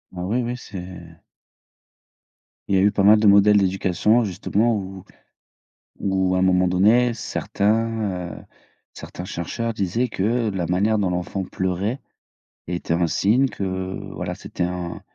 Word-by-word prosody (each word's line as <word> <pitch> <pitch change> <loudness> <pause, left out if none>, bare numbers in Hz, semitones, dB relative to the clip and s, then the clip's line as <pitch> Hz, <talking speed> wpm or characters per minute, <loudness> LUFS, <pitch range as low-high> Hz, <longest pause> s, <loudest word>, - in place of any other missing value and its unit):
Ah 90 - -4
oui 115 +7 0
oui, 120 +1 -3
c'est 90 -6 -10 1.5
Il 100 - +2
y - - +4
a 95 - +4
eu 105 - +4
pas 100 - 0
mal 105 +2 +7
de 105 - +3
modèles 100 +1 +6
d'éducation 95 +4 +2
justement, 110 +3 0
où 95 -2 -7 1.0
où 95 -1 +1
un 95 - +1
moment 90 0 +3
donné 110 +7 +3
certains, 105 -4 -1
heu - - -16 0.5
certains 90 - -8
chercheurs 105 +5 -4
disaient 110 +4 -1
que 110 +2 0
la 95 -3 -2
manière 100 +5 +1
dont 100 -3 +1
l'enfant 90 +2 -3
pleurait 95 +7 -2 0.7
était 85 -1 -2
un 85 0 +1
signe 115 +11 +2
que - - -6 0.5
voilà, - - -4
c'était - - -5
un 90 -1 -4
95 Hz, 145 wpm, -22 LUFS, 90-110 Hz, 1.5 s, mal